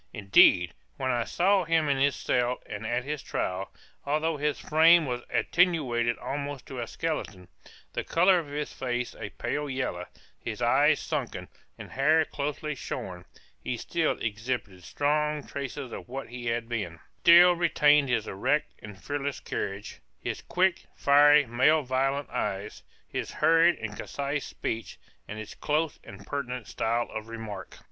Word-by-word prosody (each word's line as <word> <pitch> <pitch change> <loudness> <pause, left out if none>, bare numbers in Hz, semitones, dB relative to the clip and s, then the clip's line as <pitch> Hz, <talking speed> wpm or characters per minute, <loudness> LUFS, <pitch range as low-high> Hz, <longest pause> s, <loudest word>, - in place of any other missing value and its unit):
Indeed, 95 -4 +5 0.2
when 130 - -1
I 120 -2 0
saw 190 +2 +2
him 165 -2 +2
in 140 -1 +2
his 140 0 +2
cell 125 0 0
and 105 +2 -6
at 120 +2 -1
his 150 +1 -4
trial, 95 +1 -3 0.3
although 155 +2 0
his 150 0 0
frame 160 +2 +5
was 125 -2 -3
attenuated 130 -10 +1
almost 140 -1 -5
to 130 - -7
a 120 - -3
skeleton, 105 - -4 0.4
the - - -2
color 180 +2 +4
of 160 - -6
his 145 +1 -4
face 125 -1 -3
a - - -7
pale 145 0 -3
yellow, 125 -10 -3 0.3
his - - -5
eyes - - +4
sunken, - - -4 0.3
and - - -10
hair 155 +4 +3
closely 150 +2 -3
shorn; 90 -9 -6 0.4
he 125 - -2
still 165 +6 -1
exhibited 110 -4 -4
strong 150 - 0
traces 140 -2 -6
of - - -8
what 135 0 -6
he 120 0 -7
had 115 0 -1
been, 100 -9 -4 0.2
still 175 +1 +8
retained 150 -5 +3
his 120 -3 0
erect 145 +10 0
and 105 -3 -11
fearless 140 -1 -3
carriage, 100 +1 -5 0.2
his - - -4
quick, 180 0 +1
fiery, 145 +1 +6
and 120 -3 -14
malevolent 135 +1 +2
eye, 100 0 -2 0.4
his - - -4
hurried 165 +2 +4
and 110 -1 -6
concise 140 +3 -3
speech, 115 0 -5 0.3
and 105 - -7
his 110 -1 -7
close 155 +1 -1
and 100 0 -12
pertinent 125 -3 -4
style 115 +1 -1
of 110 0 -6
remark. 110 -4 -8
135 Hz, 155 wpm, -28 LUFS, 115-150 Hz, 0.4 s, still